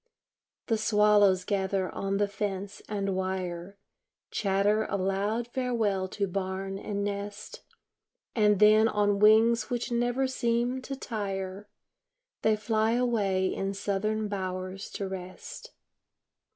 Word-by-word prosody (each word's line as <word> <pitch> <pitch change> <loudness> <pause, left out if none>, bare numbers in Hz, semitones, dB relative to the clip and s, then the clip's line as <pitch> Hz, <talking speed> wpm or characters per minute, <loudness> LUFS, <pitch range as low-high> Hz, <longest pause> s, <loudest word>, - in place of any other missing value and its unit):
The 225 -2 0
swallows 210 -3 +4
gather 190 -2 0
on 195 0 -1
the 205 0 +2
fence 200 0 -4
and 200 -2 -1
wire, 185 0 -3 0.5
Chatter 205 +2 +1
a 200 - 0
loud 200 +5 -1
farewell 230 -7 0
to 200 +2 -2
barn 195 +1 -3
and 200 -1 -3
nest, 205 +1 -5 0.7
And 210 -3 +4
then 215 +2 +6
on 205 -2 +1
wings 220 +3 +5
which 245 0 -2
never 245 +2 +1
seem 245 0 0
to 275 +1 -5
tire 200 -4 -4 0.7
They 220 0 +3
fly 220 +1 +1
away 205 -6 +1
in 195 0 -3
southern 210 +2 -1
bowers 185 -1 -4
to 200 - -3
rest. 190 - -8
205 Hz, 120 wpm, -28 LUFS, 195-220 Hz, 0.7 s, then